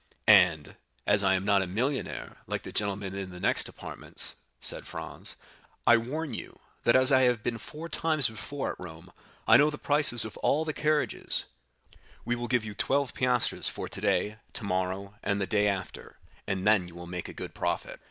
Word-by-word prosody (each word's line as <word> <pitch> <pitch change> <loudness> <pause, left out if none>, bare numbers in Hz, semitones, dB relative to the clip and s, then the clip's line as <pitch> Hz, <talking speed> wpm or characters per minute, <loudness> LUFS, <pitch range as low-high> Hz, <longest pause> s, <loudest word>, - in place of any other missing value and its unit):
"And, 90 -8 +5 0.3
as 100 0 +4
I 95 0 +4
am 95 +1 -2
not 100 -2 +4
a 95 - -2
millionaire, 125 +9 -2
like - - -3
the - - -7
gentleman 100 -2 -2
in 95 -1 -5
the 90 -1 -10
next - - +1
apartments," - - -3 0.2
said - - -4
Franz, - - -7 0.5
"I 120 - +8
warn 140 +5 -4
you, - - -6 0.3
that 120 - +5
as 130 +1 +6
I 130 -1 +6
have 125 -4 +2
been 115 -1 -2
four 155 +8 -8
times 155 -4 +1
before 110 +6 -4
at - - -10
Rome, 90 0 -10 0.4
I - - +8
know 150 +1 +5
the 150 - -6
prices 145 -7 +5
of 110 - -7
all 155 +3 +1
the 155 - -2
carriages; 150 0 0 0.8
we 120 - 0
will 120 0 -4
give 125 -3 +1
you 105 - -6
twelve 135 +5 0
piastres 125 -2 0
for - - -6
today, 105 +1 0 0.2
tomorrow, 95 0 -2
and 100 0 0
the 95 - 0
day 105 +2 +2
after, 100 -2 -4 0.3
and 95 -2 -2
then 105 -4 +4
you 85 - -13
will 85 0 -8
make 90 0 -6
a - - -8
good - - -7
profit." - - -3
105 Hz, 190 wpm, -29 LUFS, 95-130 Hz, 0.8 s, I